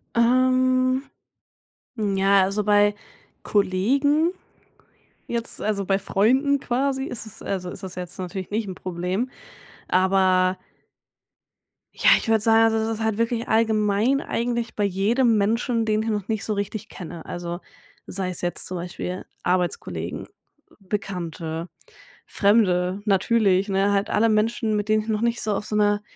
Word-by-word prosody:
Ähm. 255 Hz, +2 st, +3 dB, 0.9 s
Ja, 195 Hz, -2 st, +3 dB
also 200 Hz, +2 st, -1 dB
bei 205 Hz, 0 st, +4 dB, 0.5 s
Kollegen 275 Hz, -, +2 dB, 1.0 s
jetzt 235 Hz, -1 st, -2 dB
also 205 Hz, -2 st, -1 dB
bei 195 Hz, +1 st, +1 dB
Freunden 260 Hz, +9 st, +2 dB
quasi 265 Hz, +2 st, -1 dB
ist 235 Hz, -5 st, -6 dB
es 220 Hz, -, -10 dB
also 185 Hz, -2 st, -3 dB
ist 190 Hz, -, -8 dB
es 185 Hz, -2 st, -7 dB
jetzt 180 Hz, +1 st, -6 dB
natürlich 185 Hz, 0 st, -5 dB
nicht 210 Hz, 0 st, -2 dB
'n 185 Hz, -, -6 dB
Problem. 185 Hz, +7 st, -3 dB, 0.6 s
Aber 185 Hz, 0 st, +3 dB, 1.4 s
ja, -, -, +3 dB
ich -, -, -4 dB
würde 225 Hz, -1 st, +3 dB
sagen, 225 Hz, 0 st, +4 dB
also -, -, +1 dB
es 225 Hz, -, -3 dB
ist 220 Hz, -, -4 dB
halt 220 Hz, -1 st, 0 dB
wirklich 230 Hz, 0 st, -1 dB
allgemein 220 Hz, +3 st, +2 dB
eigentlich 235 Hz, -1 st, -2 dB
bei 210 Hz, -, 0 dB
jedem 215 Hz, +5 st, +2 dB
Menschen, 230 Hz, +3 st, +1 dB
den 215 Hz, 0 st, +1 dB
ich 225 Hz, -, -2 dB
noch 205 Hz, -3 st, -2 dB
nicht 220 Hz, -2 st, -2 dB
so 215 Hz, -, -1 dB
richtig 205 Hz, +1 st, -4 dB
kenne. 170 Hz, -2 st, -9 dB
Also, 175 Hz, 0 st, -5 dB, 0.5 s
sei 185 Hz, -1 st, -2 dB
es 180 Hz, -, -4 dB
jetzt 175 Hz, 0 st, +1 dB
zum 185 Hz, -, -4 dB
Beispiel 180 Hz, +1 st, -5 dB, 0.2 s
Arbeitskollegen, 180 Hz, -1 st, -2 dB, 0.5 s
Bekannte, 175 Hz, -4 st, -5 dB, 0.6 s
Fremde, 195 Hz, -2 st, +2 dB
natürlich, 200 Hz, -1 st, +2 dB
ne? 195 Hz, +1 st, +2 dB
Halt 200 Hz, +2 st, 0 dB
alle 225 Hz, +2 st, +2 dB
Menschen, 220 Hz, 0 st, +1 dB
mit 210 Hz, 0 st, -2 dB
denen 215 Hz, 0 st, +3 dB
ich 220 Hz, -, -9 dB
noch 215 Hz, 0 st, 0 dB
nicht 235 Hz, 0 st, +1 dB
so 215 Hz, -, +1 dB
auf 205 Hz, -, -3 dB
so 210 Hz, -, -2 dB
'ner 205 Hz, 0 st, +2 dB
210 Hz, 150 wpm, -23 LUFS, 190-230 Hz, 1.4 s, bei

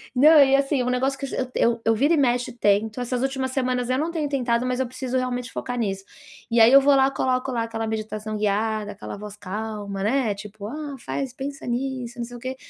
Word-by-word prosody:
Não, 300 Hz, +5 st, +7 dB
e 275 Hz, -1 st, +6 dB
assim, 275 Hz, 0 st, +1 dB
é 250 Hz, -, 0 dB
um -, -, 0 dB
negócio 265 Hz, +2 st, 0 dB
que 275 Hz, -, -3 dB
eu -, -, -6 dB
es 255 Hz, -1 st, -3 dB
eu 230 Hz, 0 st, +2 dB
eu 225 Hz, -, +3 dB
vira 280 Hz, +9 st, +3 dB
e -, -, +3 dB
mexe, 250 Hz, -3 st, +1 dB
eu 240 Hz, -, -17 dB
tento. 215 Hz, +2 st, +1 dB
Essas 245 Hz, 0 st, -2 dB
últimas 265 Hz, -1 st, -1 dB
semanas 255 Hz, -2 st, -1 dB
eu 255 Hz, -, +2 dB
não 310 Hz, +4 st, 0 dB
tenho 315 Hz, -4 st, -2 dB
tentado, 245 Hz, -3 st, 0 dB
mas 255 Hz, 0 st, -1 dB
eu 260 Hz, -, 0 dB
preciso 255 Hz, +1 st, -3 dB
realmente 250 Hz, -1 st, -2 dB
focar 245 Hz, -1 st, -4 dB
nisso. 195 Hz, -4 st, -2 dB, 0.4 s
E 230 Hz, 0 st, +4 dB
aí 225 Hz, +2 st, +8 dB
eu 275 Hz, -, +9 dB
vou 280 Hz, +1 st, +4 dB
lá, 270 Hz, 0 st, +4 dB
coloco 260 Hz, -1 st, 0 dB
lá 235 Hz, -2 st, 0 dB
aquela 225 Hz, 0 st, -3 dB
meditação 215 Hz, -1 st, -4 dB
guiada, 210 Hz, 0 st, -1 dB
aquela 200 Hz, -, -8 dB
voz 210 Hz, 0 st, -8 dB
calma, 205 Hz, 0 st, -5 dB
né, 230 Hz, 0 st, +1 dB
tipo: 205 Hz, 0 st, -9 dB
"Ah, 290 Hz, +3 st, -6 dB
faz 270 Hz, -3 st, -4 dB
pensa 275 Hz, +1 st, -6 dB
nisso, 250 Hz, 0 st, -3 dB
não 240 Hz, -, -3 dB
sei 240 Hz, +1 st, -10 dB
o -, -, -12 dB
quê". 260 Hz, +2 st, -5 dB
250 Hz, 245 wpm, -24 LUFS, 220-265 Hz, 0.4 s, eu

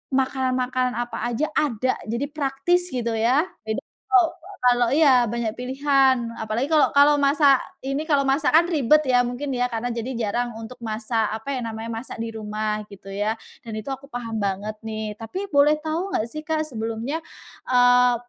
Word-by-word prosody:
makanan 260 Hz, -1 st, +1 dB
makanan 255 Hz, -1 st, 0 dB
apa 240 Hz, 0 st, -3 dB
aja 240 Hz, +6 st, 0 dB
ada 255 Hz, -3 st, +1 dB
jadi 235 Hz, +5 st, -1 dB
praktis 305 Hz, +5 st, 0 dB
gitu 240 Hz, -6 st, -2 dB
ya, 240 Hz, +7 st, +3 dB, 0.2 s
jadi 220 Hz, -, -1 dB, 0.3 s
kalo 375 Hz, -3 st, +5 dB, 0.4 s
kalo 245 Hz, 0 st, +4 dB
iya 265 Hz, -6 st, +5 dB
banyak 235 Hz, -2 st, -2 dB
pilihan 270 Hz, +1 st, +3 dB, 0.2 s
apalagi 220 Hz, +4 st, -1 dB
kalau 310 Hz, -2 st, +5 dB
kalau 290 Hz, +1 st, +6 dB
masak 280 Hz, -1 st, +5 dB, 0.3 s
ini 275 Hz, +3 st, -1 dB
kalau 280 Hz, -2 st, +3 dB
masak 275 Hz, +2 st, +2 dB
kan 335 Hz, +2 st, +6 dB
ribet 305 Hz, -2 st, +3 dB
ya 250 Hz, -2 st, +4 dB
mungkin 245 Hz, +3 st, -3 dB
ya 245 Hz, 0 st, +1 dB
karena 235 Hz, +1 st, -3 dB
jadi 235 Hz, +2 st, -4 dB, 0.2 s
jarang 240 Hz, +2 st, -2 dB
untuk 225 Hz, +3 st, -9 dB
masak 220 Hz, 0 st, -1 dB
apa 250 Hz, +6 st, -5 dB
ya, 255 Hz, -, -2 dB
namanya 225 Hz, 0 st, -5 dB
masak 230 Hz, +3 st, -6 dB
di 225 Hz, -, -4 dB
rumah 215 Hz, 0 st, -3 dB
gitu 195 Hz, -1 st, -11 dB
ya, 205 Hz, +3 st, -1 dB, 0.3 s
dan 225 Hz, -2 st, -7 dB
itu 215 Hz, -, -7 dB
aku 270 Hz, +1 st, -7 dB
paham 235 Hz, -4 st, -5 dB
banget 200 Hz, +1 st, -2 dB
nih 220 Hz, -1 st, -4 dB
tapi 365 Hz, -, -5 dB
boleh 285 Hz, +1 st, +5 dB
tahu 340 Hz, +5 st, -2 dB
nggak 215 Hz, -, +1 dB
sih 305 Hz, -, -5 dB
Kak, 315 Hz, -1 st, 0 dB
sebelumnya, 230 Hz, +3 st, -3 dB, 0.5 s
eee, 245 Hz, -1 st, +5 dB
250 Hz, 175 wpm, -23 LUFS, 225-280 Hz, 0.5 s, kalau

